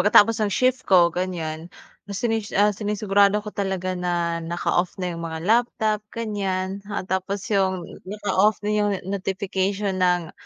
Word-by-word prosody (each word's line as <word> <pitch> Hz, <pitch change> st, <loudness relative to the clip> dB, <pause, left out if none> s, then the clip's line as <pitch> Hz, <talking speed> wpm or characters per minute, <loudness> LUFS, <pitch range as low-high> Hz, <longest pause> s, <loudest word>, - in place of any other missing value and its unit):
pagkatapos 220 Hz, +3 st, +5 dB
ng 210 Hz, -, +2 dB
shift 255 Hz, +5 st, +2 dB
ko 175 Hz, -3 st, +6 dB
ganiyan, 170 Hz, -3 st, -3 dB, 0.4 s
sinis 220 Hz, +1 st, -2 dB
ah, 210 Hz, +1 st, +4 dB
sinisigurado 205 Hz, -1 st, +2 dB
ko 210 Hz, -, -6 dB
talaga 190 Hz, -2 st, -2 dB
na 175 Hz, -2 st, -1 dB
naka-off 175 Hz, +1 st, -1 dB
na 180 Hz, -2 st, -3 dB
'yung 170 Hz, -, -6 dB
mga 160 Hz, -1 st, -5 dB
laptop 220 Hz, -1 st, +2 dB
ganiyan, 195 Hz, -3 st, -3 dB
ah, 205 Hz, -, -3 dB
tapos 190 Hz, +1 st, -2 dB
'yung 190 Hz, -3 st, +1 dB, 0.2 s
naka-off 205 Hz, 0 st, +2 dB
na 210 Hz, -, 0 dB
'yung 205 Hz, -2 st, +1 dB
no 190 Hz, +2 st, -6 dB
notification 195 Hz, 0 st, -1 dB
ng 180 Hz, -2 st, +2 dB
195 Hz, 150 wpm, -24 LUFS, 180-210 Hz, 0.4 s, ko